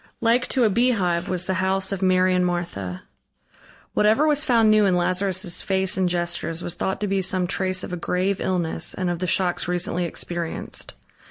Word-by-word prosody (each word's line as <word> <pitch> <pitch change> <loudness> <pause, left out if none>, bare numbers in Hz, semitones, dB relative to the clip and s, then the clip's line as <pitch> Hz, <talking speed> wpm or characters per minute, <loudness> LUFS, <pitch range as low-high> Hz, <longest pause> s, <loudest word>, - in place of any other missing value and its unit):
Like 235 +2 +2
to 255 - +2
a 220 - +4
beehive 195 -7 +1
was 180 -1 -2
the 190 - -1
house 190 0 +1
of 195 -1 -3
Mary 185 0 +3
and 180 0 +2
Martha. 170 - -3 0.9
Whatever 220 +8 +3
was 295 -1 +2
found 230 -5 +3
new 215 0 +4
in 185 - +2
Lazarus' 185 0 +1
face 190 -1 0
and 185 -1 +1
gestures 175 -1 -2
was 175 - -3
thought 190 +2 -3
to 210 - -1
be 195 0 0
some 185 0 +2
trace 185 +1 0
of - - -6
a - - -2
grave 185 +3 -1
illness 170 -3 -1
and 185 -2 -1
of 175 - -4
the 185 - -2
shocks 180 -1 0
recently 175 0 -1
experienced. 170 0 -5
185 Hz, 190 wpm, -23 LUFS, 175-195 Hz, 0.9 s, a